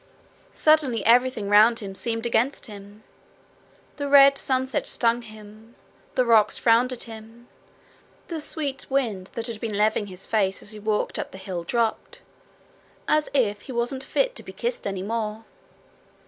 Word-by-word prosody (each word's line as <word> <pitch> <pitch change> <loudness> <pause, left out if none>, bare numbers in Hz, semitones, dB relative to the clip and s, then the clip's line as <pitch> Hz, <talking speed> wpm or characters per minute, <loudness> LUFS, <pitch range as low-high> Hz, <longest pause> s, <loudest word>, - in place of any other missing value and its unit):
Suddenly 290 -9 +2
everything 240 -2 +3
round 210 +3 +6
about 230 - -7
him 195 -1 -6
seemed 225 +4 -2
against 235 +4 0
him. 205 -1 -11 0.9
The 285 -1 -3
red 275 0 +7
sunset 260 -1 -1
stung 235 0 +2
him; 215 +1 -14 0.4
the 255 - +2
rocks 225 -3 +4
frowned 235 +2 +3
at 250 - -4
him; 225 +1 -12 0.8
the 330 -3 -5
sweet 290 -3 -3
wind 225 -9 -1
that 230 - -3
had 225 -2 -4
been 220 -3 -3
laving 210 0 +1
his 185 -1 -6
face 195 -4 0
as 210 - -9
he 215 - -9
walked 210 0 -1
up - - -4
the - - -11
hill 190 -3 -5
dropped 235 - -2 0.9
as 305 0 +2
if 210 -6 +1
he - - -10
wasn't 245 +2 -2
fit - - 0
to - - -6
be - - -11
kissed - - -3
any 190 -1 -4
more. 220 +1 -4
230 Hz, 160 wpm, -24 LUFS, 210-260 Hz, 0.9 s, red